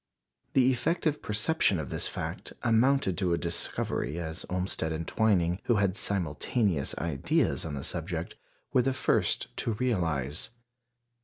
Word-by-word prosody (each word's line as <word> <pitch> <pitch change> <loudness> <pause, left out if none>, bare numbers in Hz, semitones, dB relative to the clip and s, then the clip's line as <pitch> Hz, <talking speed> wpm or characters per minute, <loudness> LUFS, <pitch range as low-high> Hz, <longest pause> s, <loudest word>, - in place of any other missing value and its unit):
The 130 0 +5
effective 155 +3 0
perception 105 - +2
of 70 -5 -5
this - - -1
fact - - -5
amounted 120 -4 +3
to 90 -3 +1
a - - +2
discovery, 85 -2 -2
as 80 0 -5
Olmsted 90 -3 -1
and 80 +1 -3
Twining, 90 -5 +2
who 120 - +3
had 100 -3 +2
"simultaneous 95 - 0
ideas" 80 -2 0
on 75 -3 -4
the 70 - -5
subject, 85 0 -4 0.4
were 125 - +5
the 135 +2 +1
first - - 0
to 115 - -1
realize. 85 - -1
90 Hz, 140 wpm, -29 LUFS, 80-115 Hz, 0.4 s, The